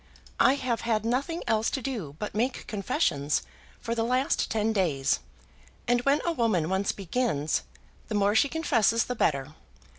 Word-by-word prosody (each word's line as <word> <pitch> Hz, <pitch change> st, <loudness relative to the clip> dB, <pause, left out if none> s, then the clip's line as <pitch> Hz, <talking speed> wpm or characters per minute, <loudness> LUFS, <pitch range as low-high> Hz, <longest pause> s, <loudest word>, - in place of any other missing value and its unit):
I 265 Hz, -, +5 dB
have 250 Hz, -4 st, -2 dB
had 220 Hz, -2 st, 0 dB
nothing 275 Hz, +9 st, -1 dB
else 220 Hz, 0 st, +1 dB
to 275 Hz, -, -2 dB
do 220 Hz, -, -4 dB
but 210 Hz, -, -5 dB
make 245 Hz, +4 st, -1 dB
confessions 150 Hz, -8 st, 0 dB, 0.4 s
for 230 Hz, -, -3 dB
the 230 Hz, -1 st, 0 dB
last 255 Hz, +6 st, +1 dB
ten 220 Hz, 0 st, +1 dB
days, 155 Hz, -10 st, +1 dB, 0.7 s
and 240 Hz, 0 st, +3 dB
when 280 Hz, +3 st, +2 dB
a 340 Hz, -, +2 dB
woman 210 Hz, -, +1 dB
once 190 Hz, +1 st, +1 dB
begins, 190 Hz, -, -1 dB, 0.5 s
the 220 Hz, -, -3 dB
more 205 Hz, 0 st, +3 dB
she 250 Hz, +6 st, +4 dB
confesses 235 Hz, -9 st, +2 dB
the 250 Hz, -, -3 dB
better. 140 Hz, -, 0 dB
225 Hz, 160 wpm, -27 LUFS, 195-250 Hz, 0.7 s, I